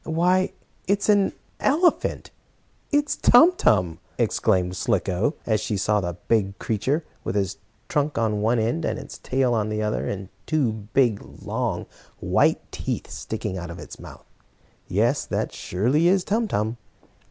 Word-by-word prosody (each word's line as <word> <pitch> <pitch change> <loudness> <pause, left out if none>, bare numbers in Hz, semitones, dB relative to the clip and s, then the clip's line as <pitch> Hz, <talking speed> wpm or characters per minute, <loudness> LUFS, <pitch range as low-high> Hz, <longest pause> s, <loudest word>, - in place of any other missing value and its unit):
"Why, 180 +3 +2 0.4
it's 200 +2 +1
an 205 -2 +4 0.3
elephant 335 +5 +1 0.6
it's 290 0 +2
Tum 320 +9 +7
Tum!" 90 - +2 0.2
exclaimed 95 -5 +1
Slicko, 95 - 0
as 110 -2 +1
she 105 - -2
saw 105 +1 +2
the 85 -1 -4
big 100 -4 +1
creature, 135 +9 -1 0.2
with - - -3
his 100 -1 -1 0.3
trunk 145 0 0
on 110 -2 +1
one 115 +3 +2
end, 110 -6 0
and - - -1
his - - -9
tail 130 -2 +1
on 110 -2 0
the 110 0 -1
other, 105 0 -1
and 95 -1 -5 0.2
two 150 -7 +2 0.2
big, 120 -6 +3 0.2
long, - - -2 0.3
white - - +1
teeth - - -4
sticking 105 -4 -4
out 85 -1 -6
of 85 - -7
his - - -10
mouth. - - -12 0.6
"Yes, 115 +9 +1
that - - -2
surely 125 - +1
is 185 0 +3
Tum 225 +2 0
Tum!" 110 - -1
115 Hz, 155 wpm, -24 LUFS, 100-160 Hz, 0.6 s, Tum